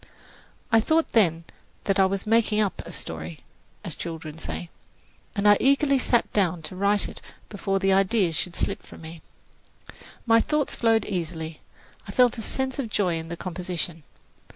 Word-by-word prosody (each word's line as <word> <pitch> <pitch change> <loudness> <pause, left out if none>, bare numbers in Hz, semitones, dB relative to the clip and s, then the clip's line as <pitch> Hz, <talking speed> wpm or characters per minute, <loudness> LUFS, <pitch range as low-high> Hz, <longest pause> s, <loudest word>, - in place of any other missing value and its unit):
I 225 - +6
thought 315 +8 +2
then 170 -7 +3 0.4
that 195 -1 +1
I 190 - +6
was 195 0 -3
"making 220 -1 +3
up 205 -3 0
a - - -7
story," 80 0 -5 0.4
as - - -4
children 160 -2 -6
say, 170 +1 -6 0.6
and 205 0 +2
I 205 0 +7
eagerly 275 +1 +3
sat 240 -1 +1
down 180 -5 +1
to 185 - -7
write 200 +2 +2
it - - -11 0.3
before 195 -1 -1
the 195 0 +2
ideas 195 -3 +3
should 175 +2 -3
slip - - -1
from - - -14
me. 160 0 -9 1.0
My 230 -1 +5
thoughts 300 +1 0
flowed 225 -2 +2
easily; 165 -4 -4 0.5
I - - -6
felt 245 -2 +3
a - - -3
sense 265 +4 -2
of 245 -5 -2
joy 185 -5 +1
in 160 - -7
the 170 +1 -6
composition. 175 -2 -5
195 Hz, 170 wpm, -25 LUFS, 170-225 Hz, 1.0 s, I